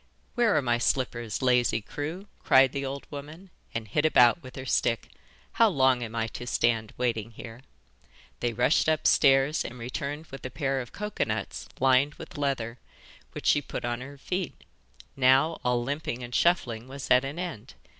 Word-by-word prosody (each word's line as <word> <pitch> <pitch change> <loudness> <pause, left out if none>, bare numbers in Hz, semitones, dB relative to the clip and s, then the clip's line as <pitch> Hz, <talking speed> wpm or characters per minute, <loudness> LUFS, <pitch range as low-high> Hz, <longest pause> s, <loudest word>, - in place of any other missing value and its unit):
'Where 235 -3 +3
are 145 - +1
my 120 -1 +1
slippers, 120 -2 -1
lazy 125 -2 +3
crew?' 155 - -6 0.2
cried 130 -1 +6
the 140 0 -3
old 135 +1 -5
woman, 155 +6 -9 0.2
and 115 -1 -4
hit 145 +9 0
about 125 -1 +5
with 130 -2 -11
her 130 - -7
stick. 115 -2 0 0.4
'How 230 -1 +4
long 130 -7 +3
am 115 -1 -5
I 115 -1 0
to 120 +2 -7
stand 115 -3 +1
waiting 115 -3 -1
here?' 115 +1 -10 0.8
They 120 - 0
rushed 125 +8 +2
upstairs 140 -2 +4
again - - -6
and 125 - -12
returned 140 +6 -4
with 135 - -9
a 130 - -4
pair 135 -1 -1
of 120 - -10
cocoa 210 0 -2
nuts 110 -2 -4
lined 135 +3 +3
with - - -11
leather, 125 -5 -2 0.5
which - - -7
she 145 - +4
put 130 - -6
on 120 0 -2
her 140 +2 -9
feet. 180 +3 -4 0.5
Now 135 +5 +4
all 125 -1 +1
limping 140 -2 -3
and 120 0 -8
shuffling 120 -10 +1
was 135 0 -8
at 125 +1 +6
an 140 +4 -5
end. 165 - -6
130 Hz, 180 wpm, -27 LUFS, 120-145 Hz, 0.8 s, cried